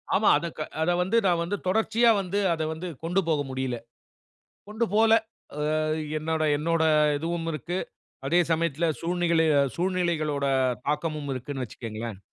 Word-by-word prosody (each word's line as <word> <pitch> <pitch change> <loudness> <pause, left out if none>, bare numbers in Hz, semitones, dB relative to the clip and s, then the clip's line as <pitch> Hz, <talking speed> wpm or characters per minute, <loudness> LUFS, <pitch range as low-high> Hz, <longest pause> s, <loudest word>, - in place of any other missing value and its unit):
ஆமாம் 215 - +5
அதை 170 +3 -3 0.3
அதை 175 +2 +2
வந்து, 195 +6 +1
நான் 175 -3 +3
வந்து 195 +4 -2
தொடர்ச்சியா 220 +4 +3
வந்து, 195 +2 -2
அத 160 - -3
வந்து 165 +3 -6 0.2
கொண்டு 180 +4 +1
போக 155 -3 +2
முடியல. 130 -2 -2 0.9
கொண்டு 220 +2 -1
போல, 220 +1 +5 0.5
ஆ - - -3 0.6
என்னோட 160 +1 -1 0.2
என்னோட 165 +2 +1 0.4
இதுவும் 165 +2 -3
இருக்கு. 165 +5 -3 0.5
அதே 170 +6 +3
சமயத்தில 165 0 +1 0.2
சூழ்நில 170 -1 +1 0.3
சூழ்நிலைகளோட 170 -5 0 0.4
தாக்கமும் 150 -1 -2
இருக்குனு 130 +1 -5
வச்சுக்கோங்களேன். 115 -2 -6
165 Hz, 130 wpm, -26 LUFS, 150-180 Hz, 0.9 s, ஆமாம்